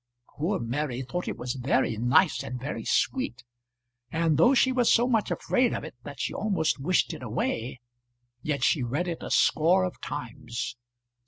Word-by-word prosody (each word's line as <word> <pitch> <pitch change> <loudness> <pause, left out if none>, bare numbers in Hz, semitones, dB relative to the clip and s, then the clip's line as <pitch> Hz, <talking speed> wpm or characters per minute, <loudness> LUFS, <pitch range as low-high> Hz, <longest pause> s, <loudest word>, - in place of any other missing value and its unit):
Poor 180 +7 0
Mary 130 +2 -2
thought 180 +7 -4
it - - -3
was 125 0 -3
very 130 -2 +1
nice 125 - +3
and 125 - -5
very 125 -3 -4
sweet, 125 0 0 0.7
and 165 0 +1
though 170 - +5
she 260 +1 +4
was 250 -2 +3
so 240 +1 +4
much 225 -4 +1
afraid 250 -2 +1
of - - -4
it - - -8
that 140 +1 -9
she - - -2
almost 190 -9 0
wished 175 +6 +1
it - - -8
away, 120 +1 -2 0.6
yet 140 -2 -2
she 145 - +3
read 140 +9 -1
it 170 -2 -4
a - - -6
score 175 +4 +4
of 185 - -4
times. 125 -5 -5
145 Hz, 175 wpm, -27 LUFS, 125-180 Hz, 0.7 s, though